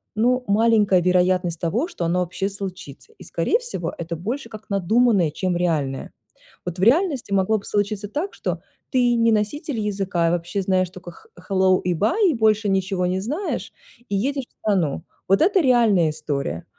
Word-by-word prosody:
ну, 250 +3 +2
маленькая 210 -3 +4
вероятность 180 -1 +2
того, 220 - 0
что 265 - -6
оно 175 +2 +1
вообще 185 +3 -2
случится. 195 - -8
И, - - -10
скорее 460 - 0
всего, 480 0 -5
это 170 0 -4
больше 230 - -4
как 215 0 -11
надуманное, 200 -1 +3
чем 180 +2 -2
реальное. 155 -6 -1 0.5
Вот 180 0 -5
в 190 - 0
реальности 275 - +2
могло 195 +3 +2
бы - - -15
случиться 205 0 -1
так, 330 - -3
что - - -4 0.3
ты 245 -2 +3
не 230 -1 +3
носитель 230 +5 -1
языка, 195 -5 -1
а 165 - +2
вообще 175 +3 -2
знаешь 185 -1 +1
только 180 -1 -11
х - - -19 0.2
hello 190 -1 +3
и 180 -1 +1
bye, 245 - +2
и - - -1
больше 215 -2 +2
ничего 190 -1 0
не 185 +1 0
знаешь, 300 - -3 0.4
и 200 - -1
едешь 270 +5 -1
в - - -38
страну. 185 -9 0 0.2
Вот 195 +1 +3
это 385 0 +4
реальная 225 - +4
история, 145 - -4
195 Hz, 180 wpm, -22 LUFS, 180-230 Hz, 0.5 s, маленькая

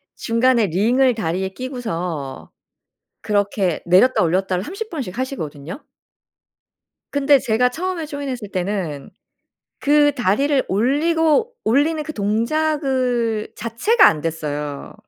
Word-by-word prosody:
중간에 230 -1 +2
링을 240 +9 +2
다리에 190 -2 -2
끼고서 180 - -5 0.7
그렇게 200 -4 0
내렸다 185 +7 +4
올렸다를 185 +2 0
30 395 - -6
번씩 260 - -6
하시거든요. 175 - -5 1.3
근데 285 0 +4
제가 245 +1 +2
처음에 345 +4 -3
조인 285 -2 -5
했을 240 -6 -5
때는 180 -7 -3 0.7
그 290 0 +4
다리를 270 +4 +1
올리고 310 - +2
올리는 295 +7 +2
그 310 - -6
동작을 245 0 0
자체가 235 - +3
안됐어요. 150 -2 -2
235 Hz, 245 characters per minute, -20 LUFS, 185-285 Hz, 1.3 s, 내렸다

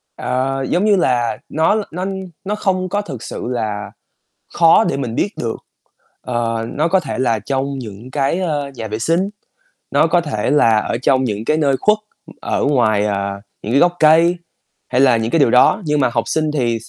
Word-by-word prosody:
Ờ, 135 +1 -2
giống 185 +4 +1
như 210 -2 +4
là, 125 -6 +1
nó 160 +6 +2
l 220 - 0
nó 180 +3 -4 0.4
nó 205 +2 -2
không 185 -3 -1
có 205 - -1
thực 135 - -8
sự - - -6
là 110 -4 -3 0.6
khó 170 +6 +5
để - - -1
mình 125 -4 -4
biết 205 - +1
được, 115 -1 -2 0.6
ờ, 115 -2 -2
nó 155 +4 +1
có 190 +2 +3
thể 150 -7 -5
là 120 -4 +1
trong 135 +4 -3
những 115 +1 -9
cái, 140 +5 0
ơ, 145 -6 -2
nhà 115 -2 -6
vệ 110 +1 -4
sinh, 170 - 0 0.6
nó - - +3
có 175 +1 +2
thể 130 -10 -2
là 115 -7 +4
ở 110 - -2
trong 130 -1 +3
những 105 -2 -3
cái 155 +6 +1
nơi 140 -4 +2
khuất, 210 0 +3 0.4
ở - - -1
ngoài, 110 -7 +2
à, 100 -1 -2 0.2
những 110 - -4
cái 140 - +4
gốc 175 0 +4
cây 165 +3 +5 0.5
hay 125 - +1
là 130 -3 +5
những 115 0 -2
cái 165 - +2
điều 140 -6 +4
đó 125 - +4
nhưng 150 -1 +1
mà 130 - +3
học 115 -1 0
sinh 155 -1 0
thì 120 -6 0
s - - -14
135 Hz, 210 wpm, -18 LUFS, 115-165 Hz, 0.6 s, khó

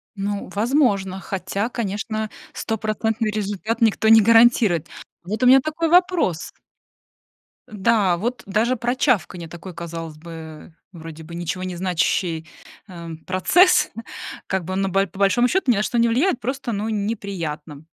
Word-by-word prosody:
Ну, 200 -1 -3
возможно, 205 -5 +1
хотя, 200 +3 -3
конечно, 215 -1 -3 0.2
стопроцентный 220 0 -2
результат 210 +2 -3
никто 220 -1 +2
не 225 0 +8
гарантирует. 225 -7 +4 0.4
Вот 210 +8 -3
у - - +5
меня 265 +2 +8
такой 310 +3 -2
вопрос. 350 - +2 1.2
Да, 205 -4 +2
вот 240 +6 -3
даже 220 +6 +1
про 240 +1 -1
чавканье- 185 - 0
такой, 175 +2 -9
казалось 165 -2 -7
бы, 170 +2 -11
э, 160 0 -10 0.2
вроде 165 -2 -10
бы 170 +2 -10
ничего 175 +2 -4
не 185 -1 -4
значащий, 170 -2 -1 0.4
эм, 170 -4 -8
процесс 325 - +4 0.6
как 190 -3 -2
бы, 185 +2 -4
но 195 0 0
б 195 +1 +2
по 190 - -14
большому 220 +5 +3
счёту, 315 -2 +1
ни - - +3
на 210 - +1
что 240 - -1
не 235 - +4
влияет. 255 +6 +1
Просто, 260 +1 -3
ну, 215 +1 -2
неприятно. 180 -9 -4
200 Hz, 150 wpm, -22 LUFS, 175-230 Hz, 1.2 s, не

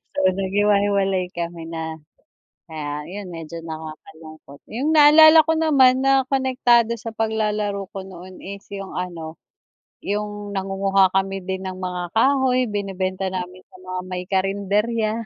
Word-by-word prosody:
So 285 - +3
naghiwa-hiwalay 195 -1 +1
kami 170 -1 -6
na 160 -1 -4 0.7
kaya 150 -2 -5
yun 195 +1 -8
medyo 165 0 -8
nakakalungkot. 155 -2 -10 0.2
Yung 280 +6 0
naalala 315 +1 +8
ko 320 - +2
naman 270 -5 +4
na 270 -1 +3
konektado 250 -4 +2
sa 225 +1 -7
paglalaro 210 -2 -1
ko 195 - -5
noon 185 -1 -12
is 200 +1 -9
yung 195 -1 -6
ano, 165 -3 -6 0.6
yung 205 0 -4
nangunguha 195 0 +2
kami 195 0 -1
din 190 +1 -4
ng 185 - -4
mga 180 -1 -5
kahoy, 255 0 +2
binebenta 190 -2 -3
namin 180 0 -6
sa - - -18
mga 185 0 -5
may 180 0 -4
karenderya. 205 +3 0
195 Hz, 135 wpm, -22 LUFS, 180-220 Hz, 0.7 s, naalala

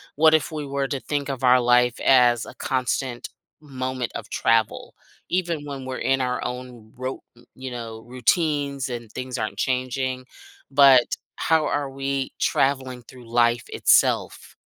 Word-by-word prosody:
what 155 +1 +5
if 160 0 0
we 150 -2 -4
were 140 0 -2
to 135 - -3
think 145 +1 -3
of 135 -2 -4
our 125 0 +6
life 125 0 +3
as 120 -3 +4
a - - -10
constant 130 -1 -2 0.3
moment 130 -3 -4
of - - -7
travel, 115 -1 0 0.4
even 170 -5 -1
when 140 -2 -6
we're 130 0 -4
in 135 0 +1
our 125 0 -1
own 125 -3 -7
rou 130 +1 -5 0.4
you 130 -1 -7
know, 115 -2 -7
routines 140 +1 0
and 120 -3 -6
things 125 +1 -5
aren't 110 -2 -4
changing, 130 0 -2 0.5
but 135 -3 +7 0.3
how 160 -2 +2
are 145 -1 -1
we 135 0 -3
traveling 130 -2 0
through 120 0 -15
life 120 0 +2
itself? - - +2
130 Hz, 150 wpm, -23 LUFS, 125-140 Hz, 0.5 s, but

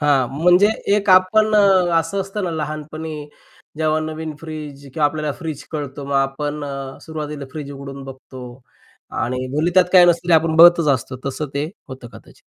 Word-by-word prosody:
हां, 140 -4 +2
म्हणजे 180 +8 +4 0.3
एक 200 -1 0
आपण 215 +4 +4
अ, 190 -4 +4
असं 165 +5 -3
असतं 195 +1 -4
ना 175 - -2
लहानपणी, 155 0 -5 0.6
जेव्हा 155 0 +1
नवीन 155 0 -5
फ्रिज 150 -3 -8
किंवा 155 - +1
आपल्याला 150 0 -3
फ्रिज 155 -4 -6
कळतो, 145 -2 -5
मग 140 0 -4
आपण 145 +2 -2
अ, 135 -1 -6
सुरुवातीला 150 -2 -6
फ्रिज 150 -2 -7
उघडून 140 0 -9
बघतो 130 -1 -11 0.8
आणि 130 +2 -2
भले 160 +3 +1
त्यात 185 -1 +6
काय 180 -1 +8
नसेल 170 0 +1
ते - - +6
आपण 160 0 +2
बघतच 170 -1 +7
असतो 130 +1 -6
तसं 140 +3 -3
ते 145 +1 -1 0.2
होतं 130 -2 -9
कदाचित. - - -15
155 Hz, 175 wpm, -20 LUFS, 140-170 Hz, 0.8 s, काय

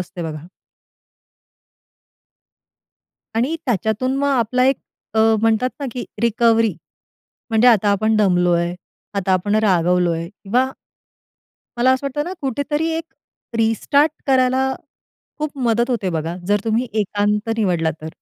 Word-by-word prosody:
असते 180 0 -6
बघा. 155 0 -6 2.9
आणि 260 +9 0
त्याच्यातून 235 +4 0
मग 280 +1 +1
आपला 250 -1 +2
एक 270 - +3 0.4
अ, - - +1 0.2
म्हणतात 225 +2 +2
ना, 280 - -2
की 250 - -4 0.2
रिकव्हरी 230 -3 +3 0.8
म्हणजे 225 +2 +5
आता 210 -3 +4
आपण 215 +2 +2
दमलोय, 175 -3 +2 0.4
आता 195 -1 0
आपण 205 +3 +1
रागावलोय 175 -3 +2
किंवा 235 +6 -1 1.1
मला 255 +2 +4
असं 260 +2 -1
वाटतं 295 +2 -2
ना, 360 - -5
कुठेतरी 285 +4 -1
एक 330 - -4 0.5
रिस्टार्ट 280 +7 +2
करायला 260 0 +3 0.7
खूप 300 -2 -4
मदत 235 +3 +1
होते 200 -7 -1
बघा 165 +1 -3
जर 205 -1 +3
तुम्ही 225 +3 0
एकांत 210 +1 0
निवडला 175 -7 +1
तर. 155 - -6
220 Hz, 120 wpm, -20 LUFS, 185-255 Hz, 2.9 s, म्हणजे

